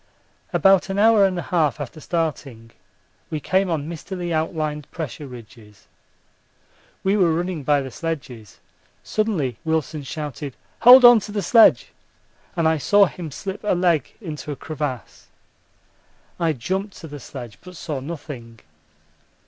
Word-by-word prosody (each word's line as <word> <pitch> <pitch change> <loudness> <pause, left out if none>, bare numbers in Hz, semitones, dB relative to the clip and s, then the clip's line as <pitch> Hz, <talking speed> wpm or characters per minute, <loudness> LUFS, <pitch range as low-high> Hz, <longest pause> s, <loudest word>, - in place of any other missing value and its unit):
About 195 0 +4
an 195 - -2
hour 215 -1 +5
and 185 -1 -3
a 175 - -3
half 155 -5 0
after 145 +2 -7
starting 145 -9 -4 0.6
we 155 - -3
came 190 +5 +1
on 155 -3 -2
mistily 175 +1 -5
outlined 155 -2 -2
pressure 150 -3 -6
ridges. 115 -4 -14 1.2
We 195 +1 +2
were 180 -5 +3
running 175 0 -2
by 145 +1 +2
the 130 - -7
sledges. 130 - -6 0.5
Suddenly 165 - -1
Wilson 160 -1 -1
shouted 145 -1 -6 0.2
'Hold 250 +2 +9
on 240 -1 +9
to 210 - -8
the 205 -1 -2
sledge,' 225 +5 +5 0.7
and 165 -2 +2
I 160 -1 +2
saw 200 +7 +5
him 175 -3 -6
slip 190 +9 -7
a 210 - +1
leg 175 -6 +1
into 155 -7 -6
a - - -4
crevasse. 145 -5 -6 1.1
I 165 -2 +1
jumped 190 - -4
to 165 - -9
the 145 -1 -9
sledge, 120 -4 -10
but 180 0 -12
saw 150 -4 -4
nothing. 130 -6 -8
160 Hz, 145 wpm, -22 LUFS, 140-185 Hz, 1.2 s, Hold